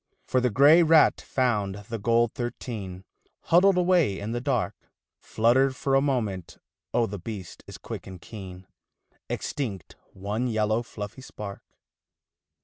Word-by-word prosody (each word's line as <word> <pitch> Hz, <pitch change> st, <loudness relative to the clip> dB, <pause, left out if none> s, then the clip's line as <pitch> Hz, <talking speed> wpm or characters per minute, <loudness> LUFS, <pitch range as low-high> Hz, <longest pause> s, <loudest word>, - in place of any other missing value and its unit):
For 130 Hz, -, +1 dB
the 125 Hz, -, +2 dB
grey 145 Hz, +9 st, +6 dB
rat 160 Hz, -1 st, +5 dB
found 105 Hz, -7 st, 0 dB
the 115 Hz, -1 st, -4 dB
gold 115 Hz, +2 st, +2 dB
thirteen 105 Hz, -6 st, -6 dB, 0.4 s
Huddled 180 Hz, +3 st, +4 dB
away 175 Hz, -, +3 dB
in 105 Hz, +2 st, -5 dB
the 120 Hz, +1 st, -2 dB
dark, 130 Hz, -4 st, 0 dB, 0.5 s
Flutter 120 Hz, +5 st, +3 dB
for 135 Hz, +1 st, -2 dB
a 135 Hz, -, +5 dB
moment, 110 Hz, -, -2 dB, 0.3 s
oh 120 Hz, -, +2 dB
the 100 Hz, -2 st, -6 dB
beast 95 Hz, -2 st, -8 dB
is -, -, -9 dB
quick -, -, -8 dB
and 95 Hz, -1 st, -9 dB
keen, 95 Hz, -2 st, -10 dB, 0.6 s
Extinct 105 Hz, -, -4 dB, 0.2 s
one 105 Hz, +6 st, -2 dB
yellow 110 Hz, 0 st, +1 dB
fluffy 105 Hz, +1 st, -8 dB
spark. 105 Hz, -6 st, -8 dB
115 Hz, 140 wpm, -26 LUFS, 100-130 Hz, 0.6 s, grey